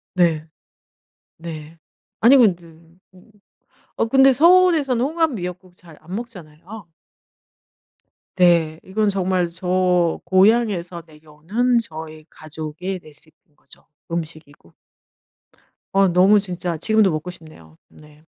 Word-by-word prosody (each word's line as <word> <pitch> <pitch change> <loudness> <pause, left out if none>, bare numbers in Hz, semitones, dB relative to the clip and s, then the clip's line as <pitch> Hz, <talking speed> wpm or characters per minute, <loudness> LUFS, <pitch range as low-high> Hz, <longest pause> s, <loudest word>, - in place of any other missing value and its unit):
네. 165 -3 +1 0.9
네. 160 -1 -10 0.4
아니 255 +5 +6
근데 190 -8 +3 0.5
음. 185 +4 -21 0.6
어 - - 0
근데 270 +3 +4
서울에서는 315 -4 +3
홍합 320 +3 0
미역국 180 -2 -8
잘 165 -4 -17
안 175 +4 -8
먹잖아요. 195 -3 -10 1.5
네. 170 -3 +2
이건 210 +2 -1
정말 185 -2 -1
저 180 -1 0
고향에서 185 -2 +1
내려오는 160 +11 -3
저희 155 -7 -6
가족의 160 +4 -7
레시피인 155 0 -14
거죠 - - -21 0.2
음식이고. 155 - -8 1.2
어 195 0 +3
너무 185 +4 +4
진짜 180 -3 -5
지금도 215 +2 +2
먹고 155 +3 -5
싶네요. 155 - -15
네. 150 0 -20
180 Hz, 225 characters per minute, -20 LUFS, 160-210 Hz, 1.5 s, 아니